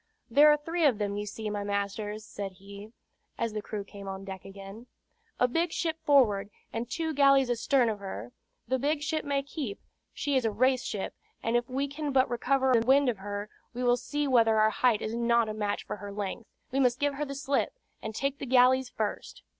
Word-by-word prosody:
"There 290 +5 +7
are 300 - +4
three 330 +3 -2
of 260 -7 +4
them, 205 -1 -2
you 205 0 -3
see, 215 +1 -5
my 205 -1 -2
masters," 205 +1 -3
said 200 -3 -6
he, 200 +3 -11 0.5
as 230 -2 -2
the 215 - -3
crew 205 -1 -5
came 200 0 -11
on 195 0 -6
deck 190 -1 -8
again. 195 +4 -10 0.5
"A 250 - +4
big 330 +7 0
ship 325 -1 -2
forward, 215 -9 +4 0.2
and 230 +1 -3
two 320 +1 -2
galleys 275 -3 +5
astern 245 +1 +2
of 215 -2 -2
her. 120 - -7 0.4
The 260 +2 0
big 290 +2 0
ship 315 +1 -1
may 280 -1 0
keep; 275 -7 -5 0.3
she 285 -1 -2
is 260 - +3
a 225 - +2
race 255 +3 +2
ship, 200 -2 -4 0.3
and 230 +1 0
if 240 0 +1
we 270 +2 -1
can 290 +1 -4
but 265 -1 +4
recover 260 +2 +2
the 230 -2 +4
wind 270 +2 +4
of 225 -5 -2
her, 205 +1 -5 0.3
we 250 - -2
will 245 0 +4
see 290 +4 -2
whether 230 -4 +4
our 215 0 +4
height 235 -1 +2
is 215 - -3
not 235 -1 +2
a 215 - -3
match 210 -1 -2
for - - -5
her 205 0 -7
length. 205 +2 -5 0.2
We 270 - 0
must 250 -2 +3
give 285 0 +1
her 285 +2 -3
the 275 -1 -6
slip, 275 - -1 0.2
and 220 0 -6
take 275 +2 -1
the 275 - -5
galleys 255 +1 +4
first." 215 -3 -4
240 Hz, 220 wpm, -29 LUFS, 205-275 Hz, 0.5 s, There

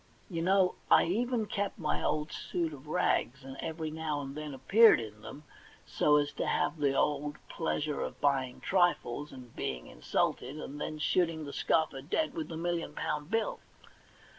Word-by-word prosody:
You 165 -2 -2
know, 185 +1 +4 0.2
I - - +7
even 230 +5 0
kept 205 -1 -2
my 155 -6 -1
old 150 +1 0
suit 165 -3 -2
of 145 +1 -11
rags, 135 -5 +1
and 135 0 -8
every 160 -1 -4
now 155 -2 -2
and 135 -1 -6
then 150 0 -5
appeared 215 - +6
in 105 -2 -8
them, 140 +7 -9 0.4
so 150 - +3
as 145 0 0
to - - -1
have 155 +2 0
the 140 -2 +2
old 150 +1 0
pleasure 150 -2 -1
of - - -4
bu3'ing 135 -3 0
trifles, 175 -7 +1
and 125 -3 -12
being - - -3
insulted, 135 +5 -1
and 145 -1 -7
then 155 - -3
shooting 160 0 +1
the 140 - -7
scoffer 155 -4 +1
dead 245 - -1
with 320 -2 -4
the 160 - -6
million 170 0 -2
pound 150 0 -2
bill. 225 +1 0
150 Hz, 175 wpm, -31 LUFS, 140-175 Hz, 0.4 s, I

